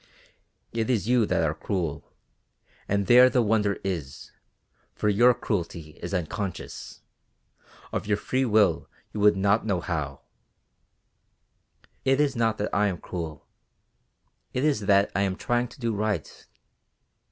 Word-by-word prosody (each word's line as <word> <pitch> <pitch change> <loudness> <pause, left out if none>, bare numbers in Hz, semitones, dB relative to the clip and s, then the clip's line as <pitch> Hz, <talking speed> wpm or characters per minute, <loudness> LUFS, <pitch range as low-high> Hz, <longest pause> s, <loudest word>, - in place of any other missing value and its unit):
"It 115 0 -2
is 115 -5 +1
you 120 -3 +3
that - - +1
are 75 -1 +1
cruel, 85 -2 -4 0.8
and 100 0 0
there 125 +4 +7
the 125 -1 +2
wonder 105 -2 +1
is, 80 -9 -5 0.6
for 105 - 0
your 120 +5 +5
cruelty 85 -6 -3
is - - -5
unconscious, 90 +1 -5 0.9
of - - -3
your 105 -1 +2
own - - -14
free 130 +1 0
will 105 -7 +2 0.2
you 105 - -4
would 105 -1 +5
not 100 +3 +2
know 100 -5 0
how." 75 -6 -4 1.8
"It 135 +1 +2
is 145 -2 +2
not 115 -2 +1
that 105 - -3
I 105 +1 +3
am 95 -3 -2
cruel, 80 -3 -6 1.1
it 125 - -1
is 135 -10 +1
that 100 -1 +4
I 100 - +2
am 95 -2 0
trying 120 +4 0
to 125 +4 -16
do 115 -2 -1
right. 105 -6 -3
105 Hz, 145 wpm, -26 LUFS, 90-115 Hz, 1.8 s, there